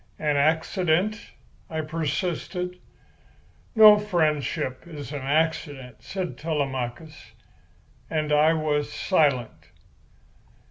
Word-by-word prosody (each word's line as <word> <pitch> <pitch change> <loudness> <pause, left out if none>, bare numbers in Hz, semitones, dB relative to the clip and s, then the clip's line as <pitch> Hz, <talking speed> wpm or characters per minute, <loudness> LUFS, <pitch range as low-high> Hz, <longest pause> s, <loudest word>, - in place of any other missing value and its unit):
"An 150 -2 0
accident?" 165 +6 +1 0.4
I 160 -1 -2
persisted. 170 +3 -3 1.0
"No 215 -2 +9
friendship 155 - -1
is 145 -4 -8
an 145 - -4
accident," 145 -3 -1
said 185 -2 -5
Telemachus; 140 -1 -4 0.8
and 155 -2 -1
I 155 +2 +4
was 150 -2 -1
silent. 140 - 0
155 Hz, 85 wpm, -25 LUFS, 145-170 Hz, 1.0 s, No